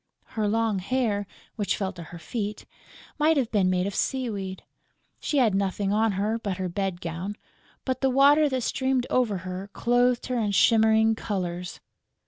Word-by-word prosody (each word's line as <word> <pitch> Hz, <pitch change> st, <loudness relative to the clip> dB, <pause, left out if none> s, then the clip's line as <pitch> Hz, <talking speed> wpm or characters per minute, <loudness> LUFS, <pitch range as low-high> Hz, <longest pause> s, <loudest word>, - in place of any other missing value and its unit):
Her 215 Hz, -3 st, 0 dB
long 220 Hz, -1 st, +1 dB
hair, 205 Hz, -1 st, -1 dB, 0.3 s
which 205 Hz, -2 st, 0 dB
fell 195 Hz, -1 st, -2 dB
to 175 Hz, -, -10 dB
her 170 Hz, +1 st, -10 dB
feet, 210 Hz, +5 st, -5 dB, 0.5 s
might 310 Hz, +1 st, +4 dB
have 255 Hz, -5 st, 0 dB
been 195 Hz, -4 st, +2 dB
made 180 Hz, 0 st, +1 dB
of 200 Hz, -, -3 dB
sea 260 Hz, +1 st, -1 dB
weed. 190 Hz, -2 st, -5 dB, 0.6 s
She 295 Hz, -, -1 dB
had 235 Hz, -6 st, +4 dB
nothing 195 Hz, +1 st, 0 dB
on 215 Hz, +1 st, +1 dB
but 195 Hz, -4 st, -3 dB
her 185 Hz, -1 st, -2 dB
bed 185 Hz, 0 st, -3 dB
gown; 175 Hz, +5 st, -4 dB, 0.5 s
but 260 Hz, -1 st, -2 dB
the 270 Hz, -, +3 dB
water 285 Hz, +3 st, +5 dB
that 260 Hz, -1 st, -1 dB
streamed 260 Hz, 0 st, 0 dB
over 235 Hz, -6 st, +2 dB
her 185 Hz, +2 st, -5 dB
clothed 245 Hz, 0 st, +2 dB
her 250 Hz, -1 st, -1 dB
in 210 Hz, -2 st, 0 dB
shimmering 220 Hz, +1 st, +4 dB
colours. 180 Hz, -5 st, -4 dB
210 Hz, 170 wpm, -26 LUFS, 190-245 Hz, 0.6 s, water